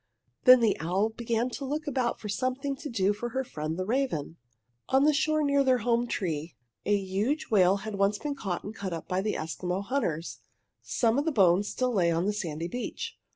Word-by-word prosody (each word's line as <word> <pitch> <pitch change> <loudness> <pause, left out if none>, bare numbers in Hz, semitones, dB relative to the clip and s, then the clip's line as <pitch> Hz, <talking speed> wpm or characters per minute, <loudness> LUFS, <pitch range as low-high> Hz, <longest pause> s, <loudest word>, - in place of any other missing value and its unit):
Then 255 -1 +9
the 220 -3 +3
owl 185 +7 +1
began 235 +1 -1
to 280 - -6
look 295 +3 -3
about 255 -4 -1
for 210 - -7
something 255 +6 -1
to 290 +2 -7
do 205 -3 +1
for 240 +4 -4
her 265 +3 -2
friend 155 -7 -4
the 185 - -2
raven. 215 - -1 0.5
On 265 +1 +4
the 300 +1 +5
shore 310 +1 +2
near 280 -1 +3
their 260 -1 +4
home 240 +1 +1
tree 165 -7 -3 0.3
a 205 0 +4
huge 200 +11 -2
whale 190 -2 +5
had 215 - -4
once 200 +1 +2
been 295 +4 -3
caught 195 -10 -4
and 205 - -6
cut 200 -4 -5
up 165 - -6
by 185 +1 0
the 210 +1 -1
Eskimo 180 +4 -3
hunters. 175 - -2 0.4
Some 235 +2 +1
of 290 - -1
the 325 - +1
bones 195 - +4
still 255 -1 -1
lay 180 -5 +3
upon 170 +2 +1
the 210 - +1
sandy 165 -5 -3
beach. 250 - -5
215 Hz, 210 wpm, -28 LUFS, 185-260 Hz, 0.5 s, Then